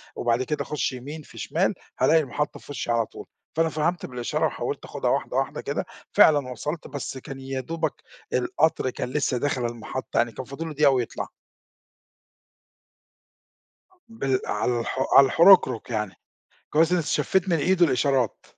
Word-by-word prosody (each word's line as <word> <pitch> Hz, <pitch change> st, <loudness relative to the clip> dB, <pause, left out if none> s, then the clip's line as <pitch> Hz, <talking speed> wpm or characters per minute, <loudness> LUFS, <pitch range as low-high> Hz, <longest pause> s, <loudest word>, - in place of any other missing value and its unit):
وبعد 120 Hz, +1 st, +1 dB
كده 150 Hz, +3 st, -2 dB
أخُش 150 Hz, -2 st, -2 dB
يمين 145 Hz, +5 st, -7 dB
في -, -, -16 dB
شمال، -, -, 0 dB, 0.3 s
هالاقي 160 Hz, -, +5 dB
المحطة 150 Hz, +2 st, -3 dB
في -, -, -12 dB
وشّي 120 Hz, -, -3 dB
على 115 Hz, -1 st, +2 dB
طول. -, -, -11 dB, 0.3 s
فأنا 165 Hz, 0 st, +2 dB
فهمت 160 Hz, +3 st, -1 dB
بالإشارة، 125 Hz, -1 st, -2 dB
وحاولت -, -, -4 dB
آخُدها -, -, -2 dB
واحدة -, -, -1 dB
واحدة -, -, -1 dB
كده، -, -, -3 dB, 0.3 s
فعلًا 145 Hz, -4 st, +5 dB
وصلت، 150 Hz, +7 st, -5 dB
بس 140 Hz, -1 st, -5 dB
كان 135 Hz, +1 st, -8 dB
يا 135 Hz, 0 st, -4 dB
دوبَك 160 Hz, +2 st, -2 dB, 0.4 s
القطر 130 Hz, +2 st, +1 dB
كان 125 Hz, -, -4 dB
لسه 135 Hz, -2 st, 0 dB
داخل 130 Hz, -2 st, -1 dB
المحطة، 120 Hz, +2 st, -5 dB
يعني 115 Hz, 0 st, +2 dB
كان 130 Hz, +4 st, -7 dB
فاضل 140 Hz, +5 st, -6 dB
له 160 Hz, -, -5 dB
دقيقة 145 Hz, -1 st, +5 dB
ويطلع. 125 Hz, -3 st, -2 dB, 2.7 s
أ -, -, -27 dB
بال 135 Hz, -, -1 dB
عالح 125 Hz, +2 st, -1 dB
على 135 Hz, -, +9 dB
الحركرك 170 Hz, -, +5 dB
يعني، 105 Hz, -5 st, -2 dB, 0.6 s
كويس 160 Hz, +3 st, +3 dB
إن 180 Hz, -, +4 dB
استشفّيت 170 Hz, +4 st, +1 dB
من 170 Hz, -, +3 dB
إيده 180 Hz, +3 st, +3 dB
الإشارات. 130 Hz, -3 st, +1 dB
135 Hz, 160 wpm, -25 LUFS, 125-160 Hz, 2.7 s, على